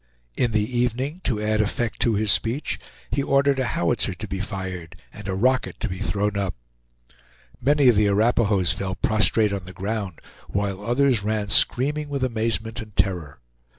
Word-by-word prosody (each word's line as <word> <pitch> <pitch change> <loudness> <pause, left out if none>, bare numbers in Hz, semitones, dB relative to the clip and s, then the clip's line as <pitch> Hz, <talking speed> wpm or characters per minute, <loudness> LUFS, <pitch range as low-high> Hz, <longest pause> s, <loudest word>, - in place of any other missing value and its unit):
In 120 - +1
the 110 +3 0
evening, 130 +8 -1
to 115 -5 0
add 110 0 +1
effect 110 +2 -2
to 115 -3 +2
his 105 0 +2
speech, 120 +6 0 0.3
he 140 - +1
ordered 140 0 +2
a 130 - +1
howitzer 115 - +1
to - - -7
be 95 - -4
fired 95 -4 -5 0.2
and 105 -1 -9
a 95 - -1
rocket 130 +6 +1
to - - -2
be 90 0 -5
thrown 105 0 -1
up. 100 -3 -2 1.1
Many 140 +1 +4
of 120 - +6
the 105 0 +4
Arapahoes 105 -3 +2
fell 95 -1 -3
prostrate 110 +1 +3
on 95 -2 -4
the 90 - -10
ground, 100 -1 -4 0.3
while 100 0 -2
others 120 0 +2
ran 105 0 -1
screaming 145 +8 +2
with 140 -2 -2
amazement 115 -1 -1
and 110 -3 -12
terror. 90 -10 -1
110 Hz, 175 wpm, -24 LUFS, 100-125 Hz, 1.1 s, of